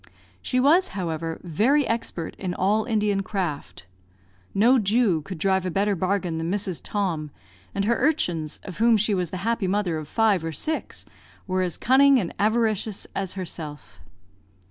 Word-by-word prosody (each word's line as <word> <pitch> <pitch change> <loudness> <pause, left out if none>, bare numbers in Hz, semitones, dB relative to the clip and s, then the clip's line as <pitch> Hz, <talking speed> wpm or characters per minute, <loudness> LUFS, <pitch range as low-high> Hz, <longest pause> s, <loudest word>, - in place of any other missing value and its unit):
She 255 - 0
was, 320 +8 +4
however, 165 -2 -3
very 235 - +2
expert 225 -7 -3
in 180 -2 -3
all 210 +3 +1
Indian 210 -3 +1
craft. 180 - -4 0.7
No 240 +6 +4
Jew 205 -5 +2
could 185 +4 -7
drive 190 +2 +1
a 185 - -2
better 200 +3 +1
bargain 185 -2 -1
than 165 +1 -2
Mrs. 190 -3 -2
Tom; 175 -7 -2 0.5
and 200 0 0
her 235 +2 +2
urchins, 175 - 0
of 185 -1 -9
whom 230 0 +5
she 215 +1 +1
was 180 -3 -1
the 185 - -5
happy 230 -4 0
mother 185 -4 0
of 155 - -8
five 210 -2 +2
or 165 0 -3
six, 310 - -3 0.4
were 185 -1 0
as 180 -2 -1
cunning 270 +2 +5
and 180 -6 -3
avaricious 215 -1 0
as 195 -2 -2
herself. 160 -5 -7
195 Hz, 165 wpm, -24 LUFS, 175-225 Hz, 0.7 s, whom